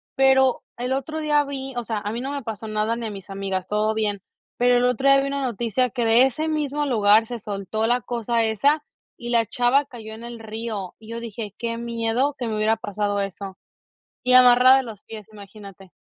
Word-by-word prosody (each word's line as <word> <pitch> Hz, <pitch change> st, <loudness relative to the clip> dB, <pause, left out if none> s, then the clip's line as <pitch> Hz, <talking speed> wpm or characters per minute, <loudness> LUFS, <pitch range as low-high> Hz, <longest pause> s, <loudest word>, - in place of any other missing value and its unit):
pero 265 Hz, -1 st, +4 dB
el 250 Hz, +2 st, -2 dB
otro 275 Hz, +4 st, -3 dB
día 300 Hz, -1 st, +2 dB
vi 270 Hz, -1 st, -6 dB
o 240 Hz, -, -2 dB
sea, 220 Hz, -2 st, -2 dB
a 205 Hz, 0 st, -4 dB
mí 235 Hz, -, -4 dB
no 270 Hz, -, -4 dB
me 280 Hz, -2 st, -4 dB
pasó 220 Hz, -1 st, -6 dB
nada 215 Hz, +2 st, 0 dB
ni 235 Hz, -1 st, -4 dB
a 215 Hz, -, -5 dB
mis 195 Hz, -1 st, -10 dB
amigas, 195 Hz, -1 st, -3 dB
todo 210 Hz, +2 st, 0 dB
bien, 205 Hz, -3 st, -1 dB, 0.4 s
pero 245 Hz, 0 st, +4 dB
el 245 Hz, -, +2 dB
otro 250 Hz, +3 st, +2 dB
día 275 Hz, -, +6 dB
vi 275 Hz, -, -2 dB
una 280 Hz, 0 st, -2 dB
noticia 240 Hz, 0 st, 0 dB
que 235 Hz, +3 st, -1 dB
de 230 Hz, +3 st, +6 dB
ese 310 Hz, +5 st, -3 dB
mismo 295 Hz, -1 st, -1 dB
lugar 220 Hz, -3 st, +4 dB
se 240 Hz, 0 st, -5 dB
soltó 210 Hz, +2 st, -3 dB
la 245 Hz, +1 st, +2 dB
cosa 235 Hz, -1 st, -1 dB
esa 280 Hz, +8 st, +2 dB, 0.4 s
y 240 Hz, -, -5 dB
la 230 Hz, -1 st, +3 dB
chava 245 Hz, +5 st, +2 dB
cayó 225 Hz, -5 st, -10 dB
en 225 Hz, +2 st, -10 dB
el 235 Hz, -1 st, -8 dB
río 220 Hz, -3 st, -6 dB
y 220 Hz, 0 st, -15 dB
yo 230 Hz, -, -5 dB
dije: 225 Hz, -3 st, -7 dB
"Qué 230 Hz, -1 st, -3 dB
miedo 235 Hz, +4 st, -1 dB
que 245 Hz, -, -2 dB
me 220 Hz, -, -2 dB
hubiera 215 Hz, +1 st, +1 dB
pasado 205 Hz, -1 st, -2 dB
eso", 195 Hz, 0 st, -6 dB, 0.7 s
y 255 Hz, 0 st, +3 dB
amarrada 250 Hz, +1 st, +7 dB
de -, -, 0 dB
los 215 Hz, -4 st, -10 dB
pies, 215 Hz, -3 st, -10 dB
imagínate. 200 Hz, -2 st, -13 dB
230 Hz, 220 wpm, -23 LUFS, 215-255 Hz, 0.7 s, amarrada